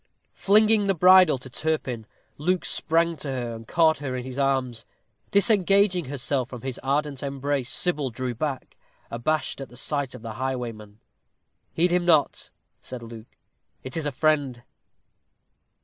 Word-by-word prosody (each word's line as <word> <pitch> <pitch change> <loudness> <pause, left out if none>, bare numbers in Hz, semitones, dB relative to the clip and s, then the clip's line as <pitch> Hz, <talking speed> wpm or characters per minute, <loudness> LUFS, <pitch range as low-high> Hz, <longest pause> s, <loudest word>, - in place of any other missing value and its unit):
Flinging 215 +1 +4
the 195 - +2
bridle 185 -3 +6
to 130 - -11
Turpin, 130 -5 -3 0.3
Luke 180 +4 0
sprang 165 0 0
to 145 - -6
her, 125 -3 -3
and 115 0 -10
caught 160 -3 +3
her 135 -3 -4
in 125 - -4
his 130 +1 -7
arms. 130 -4 0 0.5
Disengaging 200 -3 +3
herself 130 -1 -2
from 125 -3 -8
his 130 0 -5
ardent 140 0 -1
embrace, 140 -1 -2
Sybil 150 -7 0
drew 125 +1 -4
back, 135 +2 -5 0.3
abashed 140 +5 -2
at 135 - -7
the 120 - -13
sight 140 -1 -2
of 120 - -11
the 115 -1 -6
highwayman. 115 -5 -5 0.7
"Heed 175 +2 +1
him 180 0 +2
not," 160 -4 +2 0.3
said 125 -2 -8
Luke; 115 0 -12 0.5
"it 130 - -7
is 160 -2 -2
a - - -1
friend." 140 -4 0
140 Hz, 150 wpm, -25 LUFS, 125-165 Hz, 0.7 s, bridle